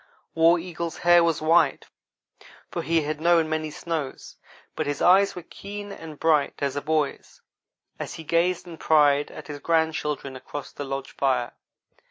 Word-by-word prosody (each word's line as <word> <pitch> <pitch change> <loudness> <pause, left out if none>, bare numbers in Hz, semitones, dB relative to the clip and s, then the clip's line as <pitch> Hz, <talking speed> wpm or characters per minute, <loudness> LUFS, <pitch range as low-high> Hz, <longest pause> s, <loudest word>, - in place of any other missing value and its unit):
War 165 +1 +5
Eagle's 170 -1 -5
hair 175 0 +5
was 165 -2 0
white, 165 +2 +3 0.9
for - - -3
he 165 +1 +1
had 150 +1 -4
known 170 -1 +4
many 155 0 -2
snows; 155 -3 -5 0.4
but 155 - -2
his 145 - -2
eyes 195 +2 +5
were 180 - -7
keen 205 +3 -8
and 160 -6 -10
bright 155 -3 +2
as 140 -1 -2
a 145 - -2
boy's, 155 -1 -2 0.6
as - - -5
he 165 - -8
gazed 170 +3 +1
in 165 -2 -10
pride 145 -2 +4
at - - -10
his 145 -1 -7
grandchildren 155 -4 -1
across 135 +2 -7
the 145 - -6
lodge 135 0 -5
fire. 130 -3 0
160 Hz, 165 wpm, -25 LUFS, 145-170 Hz, 0.9 s, War